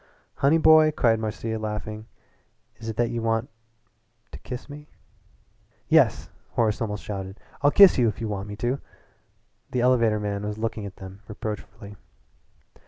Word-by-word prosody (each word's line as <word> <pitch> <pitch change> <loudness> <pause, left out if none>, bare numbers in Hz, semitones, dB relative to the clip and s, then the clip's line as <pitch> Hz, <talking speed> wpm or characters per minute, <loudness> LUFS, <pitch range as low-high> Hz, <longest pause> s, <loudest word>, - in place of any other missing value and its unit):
"Honey 145 +4 +4
boy," 155 -1 +6
cried 115 -7 +2
Marcia, 110 0 -3
laughing, 110 0 -5 0.7
"is 115 -1 -7
it 110 - -4
that 120 -1 +1
you 120 -1 -3
want 115 +1 -1 0.8
to - - -9
kiss 125 0 -7
me?" 150 +1 -11 1.0
"Yes," - - +3 0.2
Horace 110 -2 +1
almost 105 -3 -3
shouted. 95 -1 -6 0.2
"I'll 145 - +5
kiss 195 -2 +7
you 120 - +4
if 105 - -2
you 115 - -3
want 100 -1 -4
me 105 - -6
to." 120 +5 -2 0.9
The 125 - -1
elevator 115 -4 +3
man 100 -1 -3
was 105 0 -4
looking 110 -2 -3
at 95 - -11
them 95 +1 -11
reproachfully. 105 -1 -7
110 Hz, 155 wpm, -25 LUFS, 105-120 Hz, 1.0 s, kiss